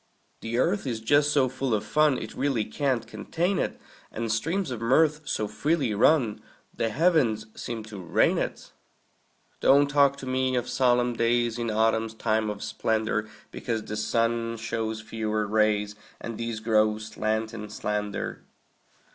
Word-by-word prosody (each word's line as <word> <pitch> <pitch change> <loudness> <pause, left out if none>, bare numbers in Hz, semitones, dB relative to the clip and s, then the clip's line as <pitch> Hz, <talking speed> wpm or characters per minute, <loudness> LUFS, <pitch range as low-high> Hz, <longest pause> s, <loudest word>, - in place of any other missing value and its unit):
The 115 +1 -3
earth 175 +5 +1
is 115 -3 -2
just 145 +6 +3
so 140 -3 +3
full 130 -2 -1
of 105 - -3
fun 150 -3 +3
It 110 - -6
really 130 -5 0
can't 130 +2 -1
contain 170 - -2
it; - - -2 0.3
And 115 0 -3
streams 160 - -1
of 120 -2 -5
mirth 150 +6 +3
so 110 -6 -1
freely 145 -3 0
run 115 0 +3 0.3
The 115 - -1
heavens 135 -7 +2
seem 115 -2 -5
to 105 -2 -9
rain 85 - +2
it. - - -4 0.9
Don't 140 +1 +5
talk 140 -1 +3
to 135 - -8
me 130 0 0
of 125 - -1
solemn 125 -1 +2
days 120 0 +1
In 115 -1 -1
autumn's 110 +1 +1
time 110 -1 0
of 105 -1 -5
splendor, 110 -1 -1 0.2
Because 115 -3 -3
the 105 - -5
sun 115 +1 0
shows 110 -1 -3
fewer 110 -1 -2
rays, 105 -1 +1 0.3
And 115 - -6
these 115 -1 -3
grow 110 -1 +3
slant 110 +1 -2
and 105 -2 -7
slender. 105 -1 -3
115 Hz, 155 wpm, -26 LUFS, 110-130 Hz, 0.9 s, Don't